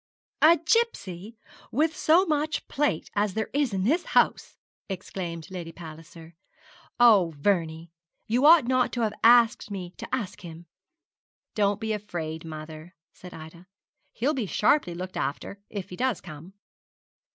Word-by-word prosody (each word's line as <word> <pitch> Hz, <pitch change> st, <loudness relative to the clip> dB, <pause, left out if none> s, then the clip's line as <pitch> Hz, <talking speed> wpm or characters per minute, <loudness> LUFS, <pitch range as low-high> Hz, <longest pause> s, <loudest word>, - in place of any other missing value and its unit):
'A 330 Hz, +3 st, +7 dB
gipsy! 225 Hz, -, -1 dB
and -, -, -24 dB
with 310 Hz, +5 st, +1 dB
so 340 Hz, +5 st, +4 dB
much 305 Hz, -2 st, -1 dB
plate 280 Hz, -, -1 dB
as 205 Hz, -2 st, 0 dB
there 220 Hz, -1 st, -2 dB
is 285 Hz, -3 st, +1 dB
in 190 Hz, -1 st, -1 dB
this 320 Hz, -, +2 dB
house!' -, -, +2 dB, 0.3 s
exclaimed 175 Hz, -3 st, -6 dB
Lady 175 Hz, -3 st, -6 dB
Palliser. 165 Hz, 0 st, -12 dB, 0.7 s
'Oh, 200 Hz, -9 st, +5 dB
Vernie, 165 Hz, -1 st, -1 dB, 0.3 s
you 245 Hz, +5 st, +3 dB
ought 325 Hz, -5 st, +7 dB
not 250 Hz, 0 st, +1 dB
to 240 Hz, -, -2 dB
have 215 Hz, -2 st, 0 dB
asked 235 Hz, -1 st, +5 dB
me 185 Hz, -3 st, -6 dB
to -, -, -8 dB
ask 220 Hz, -8 st, -3 dB
him!' 170 Hz, -1 st, -10 dB, 0.9 s
'Don't 205 Hz, -1 st, +1 dB
be 220 Hz, -1 st, -2 dB
afraid, 165 Hz, -6 st, -5 dB
mother,' 155 Hz, +2 st, -9 dB, 0.2 s
said 180 Hz, -, -12 dB
Ida; 165 Hz, +3 st, -12 dB, 0.4 s
'he 235 Hz, -, -5 dB
shall 295 Hz, -, +3 dB
be 255 Hz, -7 st, -2 dB
sharply 210 Hz, -, +2 dB
looked 185 Hz, +1 st, -6 dB
after, 200 Hz, +7 st, -4 dB
if 200 Hz, -4 st, -7 dB
he -, -, -6 dB
does 255 Hz, -1 st, -1 dB
come.' 165 Hz, +2 st, -11 dB
200 Hz, 150 wpm, -26 LUFS, 170-245 Hz, 0.9 s, A